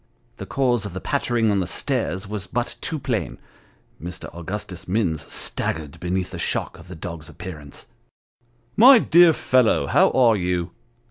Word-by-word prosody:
The - - -8
cause 125 -5 +1
of 95 - -9
the 95 - -5
pattering 115 +2 0
on 100 - +1
the 90 - -2
stairs 95 +2 -2
was 105 -1 -5
but 120 -1 -2
too 160 - -2
plain. 125 -6 -3 0.6
Mr. 85 +1 -7
Augustus 90 +1 -6
Minns 90 -6 -1
staggered 75 -3 -2
beneath 90 +1 -2
the 85 - -7
shock - - -2
of - - -14
the 90 - -9
dog's 80 -1 -8
appearance. 75 -3 -9 0.5
" 120 0 -40
My 265 0 +10
dear 175 -5 +6
fellow, 125 - +2
how - - +4
are 120 -4 +4
you 90 -2 -2
95 Hz, 160 wpm, -22 LUFS, 85-120 Hz, 0.6 s, My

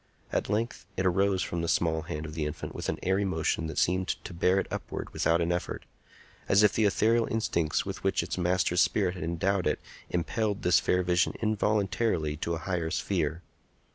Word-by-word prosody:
At - - 0
length 110 -3 -2
it 95 - 0
arose 95 +1 +2
from 85 - -3
the 85 - -2
small 80 -1 +1
hand 75 0 -5
of 75 - -7
the 75 -1 -2
infant 75 +2 -6
with - - -4
an - - -1
airy 95 +2 +2
motion 80 -3 0
that 80 - -6
seemed 95 +1 +2 0.2
to - - -7
bear 90 +2 +2
it - - -1
upward - - -5
without 85 +1 +2
an 85 +1 +1
effort, 85 - -3 0.6
as 100 +2 +5
if 105 - +5
the 110 - +2
ethereal 115 +3 +3
instincts 85 -8 0
with - - -6
which - - +1
its - - -3
master's 90 0 +2
spirit 95 -4 +2
had 90 - -6
endowed 90 +3 0
it - - +1 0.3
impelled 100 +4 -1
this 90 - +5
fair 90 0 +1
vision 90 0 +2
involuntarily 105 -6 +1
to 85 +2 -2
a 80 - -8
higher 90 -4 -1
sphere. 80 -1 -1
90 Hz, 200 wpm, -29 LUFS, 85-100 Hz, 0.6 s, as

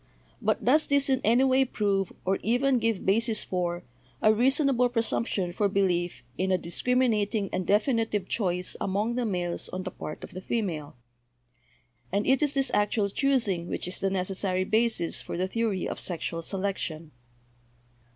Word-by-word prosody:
But - - 0
does 300 +6 +4
this 280 -1 +2
in 260 0 +2
any 235 +4 +4
way 265 0 +4
prove, 200 -6 0
or 190 +1 +2
even 250 +3 +2
give 225 -3 -1
basis 220 +2 +1
for, 175 -1 -2 0.4
a 215 - +5
reasonable 260 +1 +3
presumption 225 -6 -1
for 205 +2 +1
belief 180 -3 0 0.2
in 190 +1 +1
a 185 - +4
discriminating 215 +2 0
and 185 - -2
definitive 215 -2 +1
choice 180 -4 -1
among 205 +4 0
the 245 -1 -1
males 175 -3 -2
on 185 0 -4
the 185 - -5
part 155 - -7
of - - -8
the 185 - -7
female? 180 - -3 1.2
And 200 +2 0
it 265 +2 +3
is 290 -1 +2
this 270 -1 +2
actual 205 0 +1
choosing 220 -10 +1
which - - -2
is 180 - -2
the 195 - +1
necessary 185 0 -1
basis 220 -3 0
for - - -6
the 185 +1 0
theory 215 -2 -1
of - - -5
sexual 165 -1 -3
selection. 170 -4 -3
205 Hz, 160 wpm, -27 LUFS, 185-240 Hz, 1.2 s, a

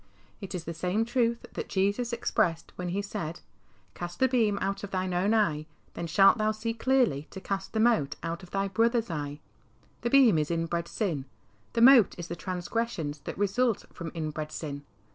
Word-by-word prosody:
It 195 -1 -6
is 175 - -4
the 170 - -5
same 185 +7 0
truth 235 -1 0
that - - -5
Jesus 200 +5 0
expressed 170 -8 0
when 180 - -4
He 195 +3 -1
said, 175 -5 -5 0.3
" 95 -3 -35
Cast 175 0 -6
the 260 - +5
beam 225 -5 +2
out 195 +1 -2
of 200 - -5
thine 185 -1 -2
own 185 +4 +2
eye, 155 -8 +1 0.3
then 170 - -4
shalt 195 +6 +5
thou 215 0 +2
see 215 +1 -3
clearly 230 - +1
to 190 - -8
cast 195 0 -4
the 220 - 0
mote 220 -11 +3
out 170 +1 -3
of 180 - -12
thy 195 +1 -1
brother's 230 +2 +1
eye." 145 -1 -4 0.6
The 235 - 0
beam 240 - +6
is 150 - -1
inbred 170 0 -1
sin; 170 - -2 0.5
the 230 - +1
mote 245 -4 +7
is 175 -1 -7
the 170 - -3
transgressions 180 -4 -3
that - - -5
result 205 +3 +1
from 170 -1 -6
inbred 155 -1 -4
sin. 145 -2 -6
190 Hz, 195 wpm, -28 LUFS, 165-225 Hz, 0.6 s, mote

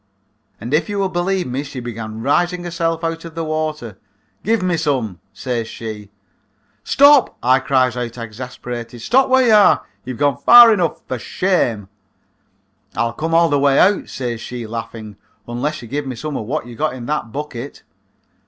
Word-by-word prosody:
And 120 +6 -6
if 155 +7 +1
you 205 - -3
will 195 -1 0
believe 180 +1 -1
me 130 +2 -3
she 140 -2 -7
began 115 -2 -6
raising 175 +6 +1
herself 165 -1 -2
out 165 0 -3
of 165 -1 -10
the 165 - -3
water. 155 -9 -4 0.4
'Give 220 -2 +1
me 180 -1 +1
some,' 130 - -1
says 120 -3 -3
she. 110 -3 -8 0.7
"'Stop,' 285 -2 +5
I 130 +2 +4
cries 130 -2 +1
out 120 -1 -5
exasperated; 120 +1 -7
'stop 260 - +2
where 260 0 +4
you 225 - +4
are; 210 -1 +5 0.2
you've 130 -2 -6
gone 145 -3 +1
far 240 -1 +8
enough. 175 -6 -1
For 130 - -4
shame.' 120 - -1 1.1
"'I'll 115 0 0
come 160 +6 -2
all 170 0 +4
the 145 -1 +2
way 140 -1 +3
out,' 200 +1 +3
says 120 -3 -4
she, 120 -1 -6
laughing, 110 -2 -7 0.3
'unless 125 +4 -3
you - - -9
give 140 +4 -3
me 130 - -4
some 150 +4 -5
of 110 - -4
wot 150 +1 -2
you 120 -1 -10
got 150 0 -1
in 120 -2 -8
that 145 -5 -3
bucket.' 140 -1 -7
140 Hz, 180 wpm, -19 LUFS, 120-165 Hz, 1.1 s, far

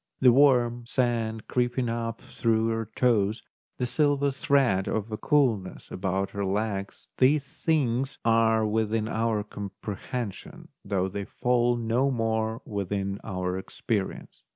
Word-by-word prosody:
The 125 -2 +7
warm 120 -3 +4
sand 115 -4 -1
creeping 125 0 0
up 115 0 -3
through 115 -1 0
her 115 0 -2
toes, 110 -3 +2 0.3
the 125 - 0
silver 140 +2 +2
thread 135 - +2
of 110 0 -2
coolness 120 - +1
about 95 +1 -1
her 100 - -3
legs, 100 0 -3
these 135 +3 +4
things 140 -4 0
are 115 -1 +4
within 110 0 0
our 110 -2 0
comprehension 105 +2 -6
though 95 -2 0
they 100 +1 -4
fall 120 +1 +1
no 120 +3 +1
more 110 -2 -1
within 100 -1 -3
our 90 -2 -2
experience. 100 +1 -4
115 Hz, 125 wpm, -27 LUFS, 100-125 Hz, 0.3 s, The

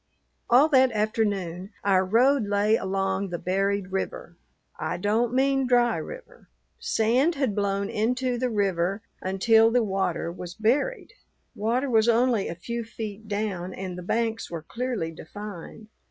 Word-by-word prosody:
All 260 +5 +6
that 260 -3 +5
afternoon 205 -4 -1
our 190 -2 +3
road 235 +4 +3
lay 205 +2 +3
along 195 0 -1
the 175 - -3
buried 195 +1 -1
river. 190 -2 -4 0.4
I - - -2
don't 220 +5 +1
mean 270 +1 +2
dry 245 -1 +3
river. - - -9 0.3
Sand 270 - +2
had 270 -6 0
blown 200 0 -1
into 245 +4 -1
the 255 0 0
river 195 -1 0 0.2
until 220 +4 +4
the 240 0 +2
water 190 -4 -1
was 180 0 -8
buried. 285 - 0 0.4
Water 235 +6 0
was 225 -2 +3
only 235 -3 +2
a - - -5
few 235 +7 -4
feet 220 -1 -7
down, 200 -3 -3
and 185 -1 -5
the 180 - -7
banks 225 +4 -1
were 165 -2 -6
clearly 235 -5 -3
defined. 205 +4 -9
215 Hz, 145 wpm, -26 LUFS, 190-240 Hz, 0.4 s, All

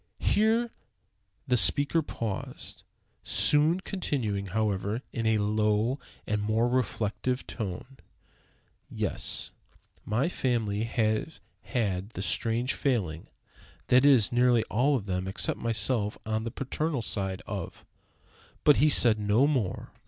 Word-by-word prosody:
Here 225 +3 +2 0.7
the 125 -1 +2
speaker 140 - +3
paused, 115 -9 -6 0.4
soon 155 +5 +2
continuing, 120 - -2
however, 105 +2 -1
in 115 -2 -1
a 110 -1 +3
lower 105 +4 +1 0.3
and 105 0 -1
more 110 +3 +1
reflective 125 0 -1
tone: 110 +5 -6 0.9
"Yes, - - -3 0.5
my 115 +8 0
family 115 - -1
have 115 +6 -1 0.2
had 100 -6 -2
the 95 - -2
strange 115 +4 0
failing 95 - -1 0.6
(that 125 +1 +5
is, 135 -7 +5
nearly 120 -1 +3
all 135 +6 +2
of 110 -7 -3
them 95 -1 -2
except 95 - 0
myself, 110 -1 0
on 110 +1 -2
the - - -2
paternal 135 +2 -3
side) 95 -3 -3
of - - -6 0.4
" - - -29
But 150 - +6
he 150 - +4
said 115 -6 +6
no 105 +6 +3
more. 130 -10 -1
115 Hz, 125 wpm, -28 LUFS, 105-130 Hz, 0.9 s, But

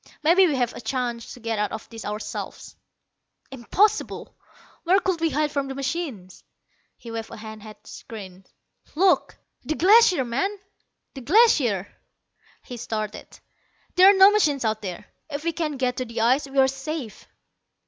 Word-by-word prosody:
"Maybe 360 +4 +5
we 300 - 0
have 245 -2 0
a - - -9
chance 240 -1 -3
to - - -14
get 230 -2 -3
out 210 - -1
of 220 - -7
this 225 -2 -9
ourselves." 210 +1 -6 0.8
"Impossible. 395 - 0 0.5
Where 370 +3 +4
could 365 -2 -2
we 330 - +2
hide 300 0 0
from 280 -2 -2
the 270 - -6
machines?" 265 - -5 0.5
He 230 - -10
waved 225 -1 -5
a - - -10
hand 220 0 -9
at 215 0 -13
the - - -21
screens. 190 -4 -10 0.5
"Look." 370 +3 +2 0.3
"The 310 - -2
Glacier, 370 - +5
man, 280 +13 -2 0.6
the 270 - -8
Glacier!" 260 - +3 0.8
He 245 - -9
started. 215 -2 -5 0.7
"There 370 +2 +7
are 400 - +5
no 385 +1 +8
machines 295 - +1
out 220 0 -1
there. 195 +1 -6 0.2
If 290 0 -5
we 335 0 -1
can 305 -3 -3
get 250 -1 -1
to 255 - -2
the 230 -1 -4
ice 260 +5 +2
we 275 0 -8
are 265 0 +6
safe." 270 -3 -6
265 Hz, 170 wpm, -24 LUFS, 225-330 Hz, 0.8 s, no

